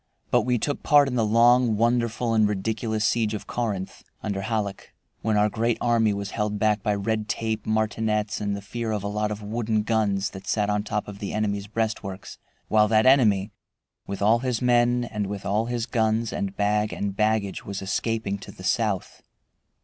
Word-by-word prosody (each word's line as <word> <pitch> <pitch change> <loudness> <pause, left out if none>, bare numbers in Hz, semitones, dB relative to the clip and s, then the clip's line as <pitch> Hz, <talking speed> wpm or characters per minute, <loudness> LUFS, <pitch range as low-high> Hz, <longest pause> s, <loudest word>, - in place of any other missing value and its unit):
But - - +4
we 125 -1 +2
took 145 +6 -2
part 145 -2 +5
in 135 - -3
the 120 -2 +2
long, 115 +1 +4
wonderful, 115 0 +1
and 110 -1 +4
ridiculous 110 +2 -1
siege 110 -1 +1
of 105 - -6
Corinth, 105 -6 -3 0.2
under 100 -2 -2
Halleck, 100 -2 -3 0.3
when 110 -1 +1
our 105 0 +4
great 115 +2 0
army 115 -3 +2
was 100 -1 -4
held 105 -1 -1
back 105 0 +2
by 105 -1 0
red 110 +1 -2
tape, 110 -2 -2
martinets, 110 -1 0
and 100 -1 -1
the 100 - -9
fear 115 +2 -4
of 105 -2 -2
a - - -2
lot 105 +1 -1
of 105 0 -5
wooden 110 0 -1
guns 105 -3 0
that 95 0 -10
sat 105 -1 +1
on 105 0 +1
top 105 0 -3
of 100 -1 -9
the 100 - -4
enemy's 100 -1 -1
breastworks, 105 -3 -4 0.3
while 105 0 +4
that 110 +1 +3
enemy, 110 -7 +4 0.6
with 100 0 -4
all 110 +3 +4
his 125 -2 -1
men, 120 0 +3
and 105 -4 -3
with 100 0 -6
all 105 +3 0
his 120 -2 -2
guns, 115 -1 0
and 100 0 -3
bag 105 +1 +1
and 100 -1 -3
baggage, 105 -2 0
was 100 0 -5
escaping 100 +1 -2
to - - -10
the 90 - -13
south. 105 -1 -1
110 Hz, 195 wpm, -25 LUFS, 100-115 Hz, 0.6 s, part